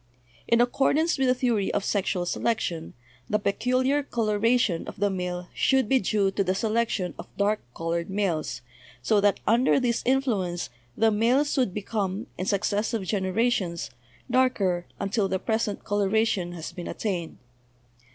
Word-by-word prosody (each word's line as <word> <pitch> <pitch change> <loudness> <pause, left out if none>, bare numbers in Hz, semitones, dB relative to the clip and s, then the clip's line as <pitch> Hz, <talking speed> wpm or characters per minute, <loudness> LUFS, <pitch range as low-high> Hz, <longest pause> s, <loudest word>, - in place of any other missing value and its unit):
In 235 0 +4
accordance 280 +6 +2
with 265 - +3
the 255 - +4
theory 235 -6 +1
of 205 - 0
sexual 190 -3 0
selection, 175 -5 -2 0.3
the 210 - +3
peculiar 255 +7 +1
coloration 230 -6 +1
of - - -8
the 205 0 +2
male 180 -1 -4
should 265 -4 +2
be 265 +3 +4
due 200 -2 +1
to 200 - 0
the 185 0 0
selection 215 -4 0
of - - -7
dark 205 +1 +2 0.2
colored 165 +1 -2
males, 170 -11 -1 0.4
so 210 -2 +3
that 205 0 +3
under 240 +5 +4
this 240 -2 0
influence 220 -10 0 0.3
the 225 0 +4
males 245 +7 +2
would 255 -8 +2
be 205 +2 -5
come, 200 0 -2
in 185 - -4
successive 205 +2 0
generations, 190 -2 0 0.4
darker 230 -9 +1
until 200 +1 0
the 190 0 0
present 220 +1 -1
coloration 205 -3 +1
has 165 -2 -6
been 175 - -7
attained. 180 -6 -3
210 Hz, 150 wpm, -26 LUFS, 185-235 Hz, 0.4 s, In